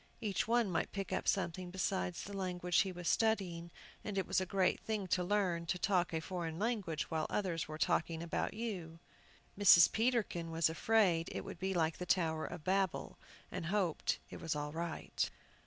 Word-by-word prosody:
Each 205 -3 -1
one 230 -4 +2
might 165 - -1
pick 195 -1 -4
up - - -2
something 180 -1 0
beside 185 -1 -1
the 200 - -6
language 180 -2 0
he 190 - +2
was 175 -1 -6
studying, 185 -7 +1 0.3
and 205 -2 -4
it 190 - +1
was - - +1
a 185 - -2
great 185 0 +2
thing 215 -3 -2
to 180 - +2
learn 180 -3 0
to 180 - 0
talk 180 -2 +1
a 160 - -1
foreign 165 -1 -4
language 200 -8 -2
while 160 -1 0
others 180 -6 -1
were 155 0 -6
talking 160 +1 0
about 170 +4 -2
you. 190 -8 -4 0.6
Mrs. 185 -4 +8
Peterkin 220 -8 0
was 165 0 +2
afraid 175 -2 +2
it - - -5
would - - -8
be 190 0 -1
like 160 -2 +1
the 180 - -4
Tower 160 -3 +1
of 175 -3 -7
Babel, 190 -1 0 0.3
and 180 -2 -4
hoped 185 -4 0
it - - -8
was 165 -2 -1
all 150 0 -3
right. 165 +1 -2
180 Hz, 190 wpm, -35 LUFS, 165-195 Hz, 0.6 s, Mrs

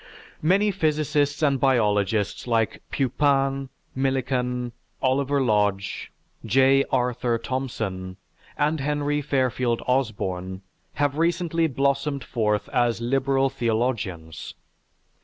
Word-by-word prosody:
"Many 195 +6 +3
physicists 150 -4 0
and 140 -3 +3
biologists 105 -5 +1
like 115 -2 0
Pupin, 135 0 +1 0.3
Millikan, 125 -2 -1 0.3
Oliver 140 +2 +1
Lodge, 105 -4 0 0.3
J. 135 +4 +4
Arthur 125 -2 +1
Thomson, 110 -7 -4 0.4
and 150 +2 +1
Henry 145 +1 0
Fairfield 130 -4 0
Osborn, 95 -7 -1 0.3
have 145 +1 0
recently 165 -1 +1
blossomed 140 0 0
forth 105 -3 0
as 120 -2 +1
liberal 135 +2 +1
theologians. 110 -10 -2
130 Hz, 90 wpm, -24 LUFS, 115-140 Hz, 0.4 s, J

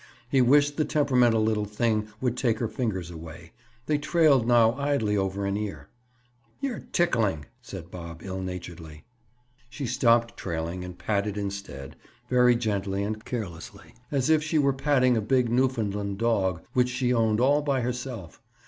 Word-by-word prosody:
He 130 +1 +3
wished 145 +3 +4
the 155 - +3
temperamental 125 -7 +3
little 110 -1 +1
thing 105 0 0
would 125 -2 0
take 120 -3 +1
her 115 - -1
fingers 105 -6 -3
away. 80 0 -10 0.3
They 150 +1 +1
trailed 150 -5 +3
now 115 -2 +5
idly 140 -6 0
over 95 0 -1
an 100 0 -1
ear. 95 -9 -5 0.7
"You're 265 -6 -3
tickling," 105 - +1 0.2
said 90 -3 -9
Bob 85 -2 -8
ill 95 -1 -4
naturedly. 85 -4 -7 0.7
She 135 +2 -5
stopped 115 -1 +2
trailing 85 +1 -4
and 90 -1 -8
patted 105 0 -1
instead—very 100 - -1
gently 100 -4 -1
and 110 +1 -4
carelessly—as 125 - -4
if 155 -1 +4
she 155 +1 -1
were 140 -2 +3
patting 135 -2 +2
a - - +1
big 125 +2 +2
Newfoundland 105 -6 0
dog 95 -6 0
which 125 -2 +3
she 125 0 0
owned 110 -2 +2
all 140 +4 +4
by 140 -3 0
herself. 125 -7 -5
115 Hz, 150 wpm, -26 LUFS, 95-130 Hz, 0.7 s, now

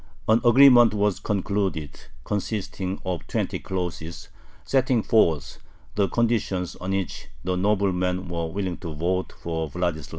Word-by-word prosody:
An 110 +2 +4
agreement 120 -2 +7
was 105 -1 +1
concluded, 100 -7 -1 0.3
consisting 100 -2 -3
of 90 -2 -3
twenty - - -2
clauses, 90 -3 -5 0.4
setting 130 -4 +2
forth 80 - +2 0.3
the 100 -2 +1
conditions 110 -6 0
on 90 - -6
which 95 -1 -3 0.2
the 90 0 -1
noblemen 90 -2 0
were 85 -1 -3
willing 95 0 -3
to 80 -4 -7
vote 90 +4 -1
for 80 -2 -3
Vladislav. 80 -2 -2
95 Hz, 130 wpm, -25 LUFS, 85-105 Hz, 0.4 s, agreement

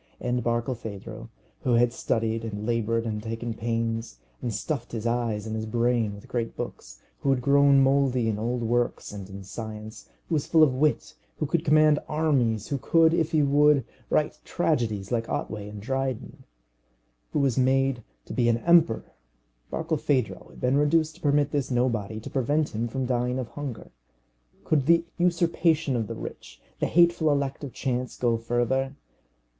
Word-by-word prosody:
And 125 -1 -1
Barkilphedro, 115 -2 -4 0.3
who 125 - +1
had 120 0 +3
studied 115 -2 -1
and 105 -2 -5
laboured 115 0 0
and 105 -2 -3
taken 115 +1 -4
pains, 115 0 -2 0.2
and 120 - -2
stuffed 120 +2 -4
his 115 -1 -4
eyes 115 -3 -1
and 110 0 -4
his 110 0 -3
brain 115 -2 +1
with 100 - -13
great 115 -2 -3
books, - - -7 0.2
who 140 - -1
had 130 -2 +2
grown 140 0 +5
mouldy 135 -3 +2
in 105 -2 -1
old 120 +2 -1
works 120 +1 0
and 100 -2 -8
in 100 0 -8
science, 110 +2 -8 0.2
who - - -3
was 150 -3 0
full 160 -2 +5
of 140 -4 +4
wit, 150 +4 0 0.2
who 155 - -1
could 160 +2 0
command 155 -1 +5
armies, 130 -9 +1
who 140 - -1
could, 165 +4 +4
if 165 -2 +1
he 155 -2 +3
would, 145 -1 +4 0.2
write - - +1
tragedies 105 -5 -1
like 115 -1 -1
Otway 105 -1 -3
and 105 0 -8
Dryden, 130 -1 -3 0.9
who - - -1
was 135 -4 +2
made 135 -1 +2 0.2
to - - -7
be 120 -2 +2
an 115 - +3
emperor 165 -4 +3 0.6
Barkilphedro 130 -6 -1
had - - -15
been 125 +2 +2
reduced 155 +2 +2
to - - -22
permit 145 -1 +2
this 140 -3 -1
nobody 115 -4 0
to - - -8
prevent 145 +4 +1
him 115 +2 -1
from 130 +2 -3
dying 125 0 0
of 125 -3 -4
hunger. 140 -6 -7 0.7
Could 145 -4 +1
the 170 0 +5
usurpation 165 -4 +2
of 115 -3 -1
the - - -5
rich, - - -9 0.2
the - - +1
hateful 170 -2 +4
elect 140 0 -1
of 140 - -5
chance, 125 -1 -3
go 120 -2 +2
further? 120 +4 0
125 Hz, 170 wpm, -26 LUFS, 115-140 Hz, 0.9 s, grown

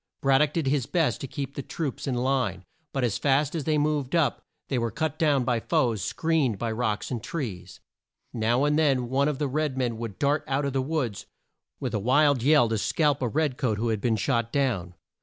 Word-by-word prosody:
Brad 135 -1 +4
dock 150 -1 +2
did 165 -3 -1
his 135 -2 +1
best 165 -4 +1
to 135 - -4
keep 140 0 -5
the 140 - -4
troops 140 -1 -4
in 130 - 0
line; 125 -7 0 0.3
but 135 - -2
as 115 -5 0
fast 140 +1 +2
as 160 -4 -3
they 155 -1 +2
moved 150 -1 0
up, 165 -4 +1 0.3
they 130 - 0
were 115 0 0
cut 155 +6 -3
down 145 -5 +3
by 120 -2 +1
foes 115 -2 0
screened 155 -9 0
by 115 +2 -2
rocks 110 0 -2
and 120 -3 -2
trees. 95 - -5 0.5
Now 120 +3 +1
and 150 +1 +2
then 135 -6 +2
one 135 +2 +2
of 150 -3 -1
the 145 - -1
red 145 0 -1
men 120 -3 -1
would 115 -5 -5
dart 145 +5 +1
out 140 0 0
of 140 - -2
the 135 - +1
woods 130 -7 -2 0.5
with - - -3
a 105 - 0
wild 140 +4 +3
yell 140 -2 +5
to 110 -1 0
scalp 145 +4 +1
a 125 - +1
red 145 +1 0
coat 120 -7 0
who 115 +2 -1
had 110 -2 -1
been 115 -2 +1
shot 115 +1 0
down. 105 -11 -1
135 Hz, 225 wpm, -26 LUFS, 115-145 Hz, 0.5 s, yell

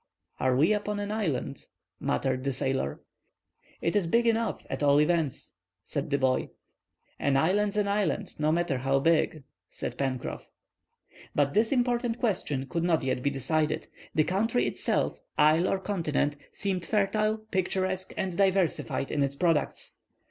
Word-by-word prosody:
"Are 130 -1 +2
we 155 +10 +4
upon 210 0 -2
an 205 0 -3
island?" 155 - -2 0.3
muttered 130 - -1
the 140 0 -1
sailor. 130 - -2 0.8
"It 170 - 0
is 200 -5 +2
big 235 +7 +3
enough, 230 0 0
at - - -4
all 145 0 +5
events," 155 -3 0 0.3
said 145 0 -3
the 140 - +2
boy. 130 -1 +1 0.7
"An 140 -1 +2
island's 200 +7 +2
an 205 -1 +2
island, 200 -1 0
no 155 0 +2
matter 165 -5 0
how 135 +1 +2
big," 155 0 +2 0.3
said - - -6
Pencroff. 130 -2 -3 0.9
But 140 -1 +2
this 220 +3 +2
important 240 -2 +1
question 175 - -1
could 170 +4 -2
not 170 -4 +2
yet 130 -1 -1
be 140 - +1
decided. 150 +3 -1 0.3
The 155 - +5
country 220 +8 +1
itself, - - 0 0.2
isle 155 +4 +5
or - - +1
continent, 165 -7 -1 0.2
seemed 190 -3 -1
fertile, 215 +2 +1
picturesque, 185 0 -1
and 185 -2 -2
diversified 190 -7 +1
in 145 - 0
its 140 0 0
products. 165 -1 0
170 Hz, 150 wpm, -28 LUFS, 140-205 Hz, 0.9 s, all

